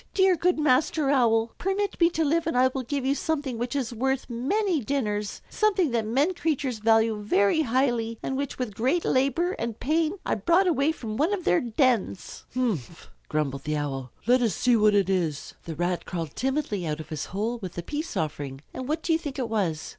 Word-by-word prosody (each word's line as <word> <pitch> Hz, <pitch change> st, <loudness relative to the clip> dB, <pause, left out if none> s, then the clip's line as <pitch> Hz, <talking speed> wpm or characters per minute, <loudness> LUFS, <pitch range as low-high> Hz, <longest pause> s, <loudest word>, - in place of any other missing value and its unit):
"Dear, 380 Hz, -1 st, +5 dB
good 355 Hz, +1 st, +1 dB
Master 295 Hz, 0 st, +2 dB
Owl, 230 Hz, -4 st, +3 dB
permit 390 Hz, 0 st, -1 dB
me 335 Hz, -, +6 dB
to 325 Hz, -2 st, 0 dB
live 325 Hz, +3 st, +1 dB
and 285 Hz, -, 0 dB
I 260 Hz, +1 st, +5 dB
will 260 Hz, 0 st, -3 dB
give 270 Hz, +1 st, -3 dB
you 270 Hz, -, +3 dB
something 285 Hz, -5 st, -2 dB
which 240 Hz, +2 st, -3 dB
is 255 Hz, -4 st, -2 dB
worth 265 Hz, +3 st, -1 dB
many 335 Hz, -, 0 dB
dinners, 210 Hz, -5 st, -2 dB
something 390 Hz, -, +1 dB
that 230 Hz, -2 st, 0 dB
men 280 Hz, +11 st, +2 dB
creatures 285 Hz, -8 st, -1 dB
value 225 Hz, 0 st, +3 dB
very 205 Hz, +6 st, +3 dB
highly, 240 Hz, -4 st, 0 dB
and 265 Hz, -, -2 dB
which 280 Hz, 0 st, -3 dB
with 250 Hz, -5 st, -3 dB
great 265 Hz, -, 0 dB
labor 275 Hz, +7 st, +2 dB
and 230 Hz, -1 st, -3 dB
pain 320 Hz, +3 st, +1 dB
I -, -, +1 dB
brought 340 Hz, -, +3 dB
away 315 Hz, -4 st, +2 dB
from 220 Hz, -8 st, -6 dB
one 330 Hz, +8 st, +2 dB
of 365 Hz, -, -7 dB
their 175 Hz, -, +3 dB
dens." 235 Hz, -, 0 dB
"Umph!" 200 Hz, -, -2 dB, 0.2 s
grumbled 140 Hz, -3 st, -1 dB
the 150 Hz, 0 st, -1 dB
Owl. 135 Hz, -4 st, -4 dB
"Let 250 Hz, +2 st, +4 dB
us 225 Hz, -8 st, +1 dB
see 245 Hz, +5 st, +3 dB
what 210 Hz, -2 st, +4 dB
it 200 Hz, -3 st, +3 dB
is." 170 Hz, -7 st, -1 dB
The 165 Hz, -, -5 dB
Rat 175 Hz, +2 st, -1 dB
crawled 165 Hz, -5 st, -4 dB
timidly 260 Hz, -, -1 dB
out 150 Hz, 0 st, -2 dB
of 155 Hz, -, -8 dB
his 155 Hz, -2 st, -4 dB
hole 220 Hz, +5 st, -3 dB
with 185 Hz, -5 st, -6 dB
the 175 Hz, -, -5 dB
peace 300 Hz, -, -4 dB
offering; 145 Hz, -3 st, -3 dB
and 260 Hz, -, -5 dB
what 310 Hz, +2 st, -2 dB
do 335 Hz, -, +2 dB
you 320 Hz, -, +2 dB
think 290 Hz, -5 st, -6 dB
it 250 Hz, -4 st, -2 dB
was? 180 Hz, -8 st, -1 dB
250 Hz, 210 wpm, -26 LUFS, 205-300 Hz, 0.2 s, me